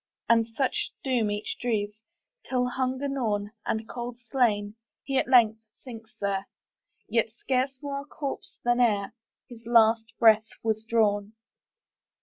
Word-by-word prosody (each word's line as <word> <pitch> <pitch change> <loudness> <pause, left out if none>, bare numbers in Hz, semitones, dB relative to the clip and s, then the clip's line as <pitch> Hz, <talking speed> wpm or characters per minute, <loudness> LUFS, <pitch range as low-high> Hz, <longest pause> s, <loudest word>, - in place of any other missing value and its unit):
And 230 -1 +4
such 250 +3 -1
doom 245 -5 +1
each 205 0 -3
drees, 210 -3 -1 0.4
Till, 250 -1 0
hunger 260 +2 -1
gnawn, 215 -7 -1 0.2
And 220 0 -1
cold 240 -1 -6
slain, 225 -5 0 0.3
he 270 -1 +1
at - - -1
length 225 -4 +5
sinks 230 -2 -11
there, 200 -1 -1 0.6
Yet 230 -1 +1
scarce 260 +3 -1
more 280 -1 -3
a - - -13
corpse 285 -1 -6
than 240 0 +2
ereHis 230 +1 -2
last 225 -1 +4
breath 220 -1 +6 0.2
was 220 -1 -1
drawn. 210 -2 +1
230 Hz, 130 wpm, -27 LUFS, 215-250 Hz, 0.6 s, breath